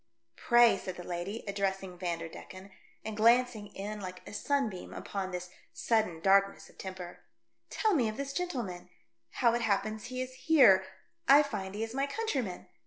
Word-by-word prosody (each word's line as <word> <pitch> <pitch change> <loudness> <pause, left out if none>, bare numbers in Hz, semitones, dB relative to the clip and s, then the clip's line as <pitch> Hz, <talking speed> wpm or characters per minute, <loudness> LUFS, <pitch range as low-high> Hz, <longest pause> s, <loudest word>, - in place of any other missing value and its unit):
" 115 - -52
Pray," 240 -1 +6
said 185 - -6
the 180 - -8
lady, 180 +6 -4
addressing 195 -2 -2
Vander 170 -2 -3
decken, 185 +4 -11 0.3
and 220 -1 -4
glancing 230 -1 +3
in 210 +2 -5
like 185 -2 -8
a - - -9
sunbeam 225 -6 -2
upon 195 -2 -4
this 180 -1 -6 0.2
sudden 215 -8 0
darkness 195 +1 +3
of - - -28
temper, 185 -2 -7 0.5
"tell 435 -2 +1
me 245 -9 +2
of 215 - -6
this 275 0 -4
gentleman 240 - -4 0.2
— 115 0 -51 0.2
how 235 - +6
it 240 - 0
happens 215 0 -1
he 255 +1 -5
is 255 0 -4 0.2
here; 240 -12 +7 0.4
I 285 +2 +8
find 200 -8 -5
he 215 - -2
is 225 0 -5
my 275 +2 0
countryman. 280 - -3
205 Hz, 175 wpm, -31 LUFS, 185-245 Hz, 0.5 s, I